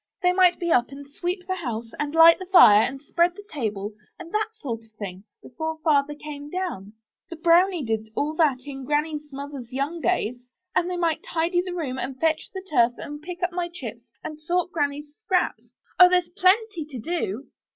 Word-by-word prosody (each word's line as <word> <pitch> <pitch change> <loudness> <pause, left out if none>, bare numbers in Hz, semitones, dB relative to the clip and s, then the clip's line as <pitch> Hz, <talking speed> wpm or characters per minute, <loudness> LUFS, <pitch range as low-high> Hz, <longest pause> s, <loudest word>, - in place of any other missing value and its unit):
'They 360 - +5
might 360 -1 +4
be 345 -1 -1
up 240 -4 +3
and 280 +1 -10
sweep 355 +6 -4
the 375 - -1
house, 235 -8 -5
and 295 +1 -2
Hght 330 0 +8
the 370 - -7
fire, 215 - +8
and 265 +4 -2
spread 345 +3 +1
the 410 - -11
table, 210 -6 -3 0.2
and 345 -1 -10
that 430 +1 0
sort 245 - -6
of 225 - -23
thing, 190 -2 -7 0.2
before 315 +5 -5
Father 295 -2 +2
came 295 -1 -8
down. 320 - -4 0.4
The 335 - -6
BROWNIE 340 -1 +3
did 220 -1 -2
all 300 +2 -1
that 285 -6 +3
in 270 -2 -7
Granny's 300 +1 -2
mother's 275 -3 -7
young 280 +6 -2
days. 250 -9 -1 0.3
And 355 - +2
they 360 - -3
might 335 -3 0
tidy 340 +2 0
the 360 -1 -6
room, 265 -7 -3
and 260 +1 -5
fetch 320 -1 0
the 380 -1 -7
turf, 240 -7 +3
and 295 0 -7
pick 355 +2 -7
up 355 - +1
my 345 0 -2
chips, 240 -7 -9
and 305 0 -7
sort 355 +3 -1
Granny's 290 -1 -2
scraps. 365 -2 -1 0.3
Oh! 360 0 +10
there's 360 -1 +2
plenty 375 0 +2
to 285 -4 -9
do." 270 - -3
305 Hz, 200 wpm, -24 LUFS, 265-350 Hz, 0.4 s, Oh